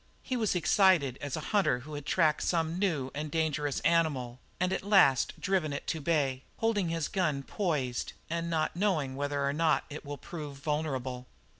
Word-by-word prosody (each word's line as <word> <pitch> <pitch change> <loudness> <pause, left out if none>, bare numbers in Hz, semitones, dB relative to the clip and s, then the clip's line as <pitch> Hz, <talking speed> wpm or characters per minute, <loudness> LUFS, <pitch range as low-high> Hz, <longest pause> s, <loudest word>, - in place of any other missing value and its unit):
He 255 - -2
was 220 -6 +1
excited 175 -7 +3
as 145 0 -3
a 150 - -6
hunter 190 -12 +3
who 150 +4 -10
has 145 0 -5
tracked 155 -1 +2
some 165 0 0
new 155 -10 0
and 150 +1 -4
dangerous 150 -2 -1
animal 140 -8 +1 0.2
and 180 +1 +1
at - - -1
last 190 - +4
driven 190 -6 0
it 140 - -5
to 160 - -2
bay, 140 -4 +1 0.2
holding 210 -6 +1
his 165 -2 -1
gun 155 -8 0
poised, 140 -10 -2
and 170 +1 -2
not 160 -1 0
knowing 165 -9 0
whether 145 0 -1
or 140 - +1
not 160 0 +2
it 150 - -7
will 145 -1 -6
prove 145 -1 -7
vulnerable. 135 -4 -3
155 Hz, 180 wpm, -30 LUFS, 140-170 Hz, 0.2 s, last